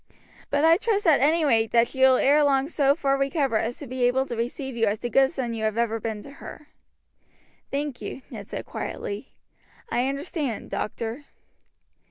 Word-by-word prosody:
But 285 +2 +2
I 330 +1 +6
trust 420 -1 0
at 315 -4 +5
any 315 +3 +3
rate 225 -5 +3
that 235 0 +5
she 265 - -9
will 260 -1 +7
ere 295 +2 +4
long 275 -1 +2
so 285 -3 +2
far 275 -4 0
recover 275 -4 +1
as 235 +3 -3
to 290 - -8
be 255 0 -5
able 260 +2 +2
to 240 - -5
receive 245 +3 -4
you 225 -1 +2
as 205 +1 0
the 240 - -3
good 270 +3 +5
son 260 -6 -3
you 225 -1 -4
have 215 0 0
ever 230 -1 0
been 215 -1 -4
to 280 - -11
her." 300 -1 -10 1.0
"Thank 285 -2 -3
you," 265 - -6
Ned - - -8
said - - -5
quietly. 455 -4 -6 0.6
"I 245 +2 +1
understand, 275 - -3
doctor." 230 +6 -4
270 Hz, 195 wpm, -25 LUFS, 235-290 Hz, 1.0 s, will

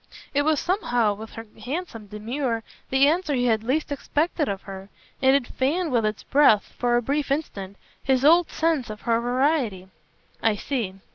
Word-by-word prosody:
It 285 - +3
was 305 0 +2
somehow, 245 - +1
with 220 +2 -10
her 225 - -8 0.2
handsome 250 - -5
demur, 230 +3 -3 0.3
the 265 +1 +4
answer 320 -1 +1
he 245 -1 +1
had 220 -2 +2
least 285 +6 -1
expected 300 +2 -1
of 195 -1 -4
her; 195 0 -9 0.3
and 265 0 +5
it 280 -3 +1
fanned 305 +7 -1
with 230 -3 +2
its 215 0 -4
breath, 275 -7 +4
for 240 -1 +2
a 240 - 0
brief 285 +4 -1
instant, 200 -10 -3 0.2
his 265 0 +1
old 335 +3 +6
sense 315 -7 0
of 215 0 -7
her 230 0 +1
variety. 245 - 0 0.5
"I 225 -2 +2
see. 215 -4 -3
255 Hz, 180 wpm, -24 LUFS, 220-290 Hz, 0.5 s, old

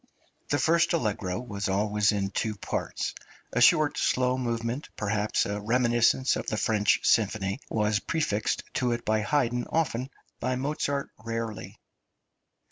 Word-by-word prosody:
The 145 - +2
first 170 +5 +3
allegro 105 - -1
was 100 -5 -4
always 105 +1 +2
in 100 -2 -1
two 110 +2 -1
parts; 100 - -3 0.4
a 125 - +1
short 155 +3 +5
slow 125 0 +2
movement, 120 +2 -3
perhaps 105 0 0
a 105 +1 -3
reminiscence 120 +3 +3
of - - -4
the 110 - -1
French 105 -2 +2
symphony, 105 0 +2
was 105 -1 +1
prefixed 155 - -1
to 125 -2 +1
it 120 0 -5
by 110 0 +2
Haydn 120 0 0
often, 135 -5 -1 0.3
by 130 +1 -1
Mozart 140 +1 -2
rarely. 115 -3 -5
115 Hz, 135 wpm, -27 LUFS, 105-130 Hz, 0.4 s, short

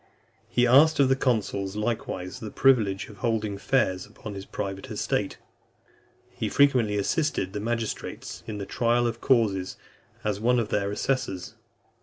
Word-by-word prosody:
He 125 - +3
asked 145 +6 +6
of 135 -2 +5
the 135 - +4
consuls 105 -6 -1
likewise 105 -4 -3
the 110 - -6
privilege 110 -7 +3
of 105 - -13
holding 110 -4 -1
fairs 100 -4 +1
upon 105 0 -9
his 95 0 -8
private 95 0 -5
estate. - - -1 0.9
He - - -3
frequently 125 -7 +3
assisted 100 - 0
the - - -3
magistrates 115 +1 -4
in 110 -2 -4
the 100 - -4
trial 120 +2 +1
of 115 0 -2
causes, 105 -8 +2 0.5
as 105 -2 -1
one 125 +3 +3
of 115 -3 0
their 100 -1 0
assessors. 105 -4 -2
110 Hz, 150 wpm, -26 LUFS, 100-125 Hz, 0.9 s, asked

